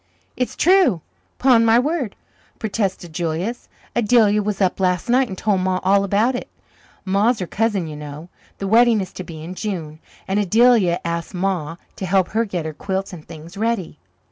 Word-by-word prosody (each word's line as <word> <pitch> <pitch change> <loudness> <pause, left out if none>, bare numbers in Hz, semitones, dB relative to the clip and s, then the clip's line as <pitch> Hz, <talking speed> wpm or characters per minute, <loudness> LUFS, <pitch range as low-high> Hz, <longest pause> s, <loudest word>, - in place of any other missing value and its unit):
"It's 250 - -2
true, 350 - +4 0.4
'pon 250 -3 +5
my 225 0 +5
word," 270 - -1 0.4
protested 195 -6 -3
Julius. 175 +8 -3 0.3
"Adelia 215 -2 +4
was 210 0 -2
up 190 -2 +1
last 180 +2 0
night 255 +1 +4
and 190 - -7
told 205 -1 +1
Ma 185 0 0
all 195 +1 +4
about 205 +6 +2
it. 245 - -5 0.6
Ma's 205 +5 +2
her 185 - -3
cousin, 205 -1 0
you 155 -1 -7
know. 150 +2 -8 0.3
The 195 - -4
wedding 230 +1 +5
is 190 -1 -5
to 185 - -6
be 160 -3 -9
in 175 +3 -6
June, 175 -7 -5 0.3
and 195 +2 +1
Adelia 210 -3 +4
asked 170 +2 -3
Ma 175 -4 -1 0.2
to 190 - -4
help 190 0 +2
her 225 +1 0
get 180 -6 -4
her 160 - -4
quilts 190 +4 -4
and 160 -4 -11
things 165 +2 -11
ready." 215 -8 -2
195 Hz, 180 wpm, -21 LUFS, 175-225 Hz, 0.6 s, pon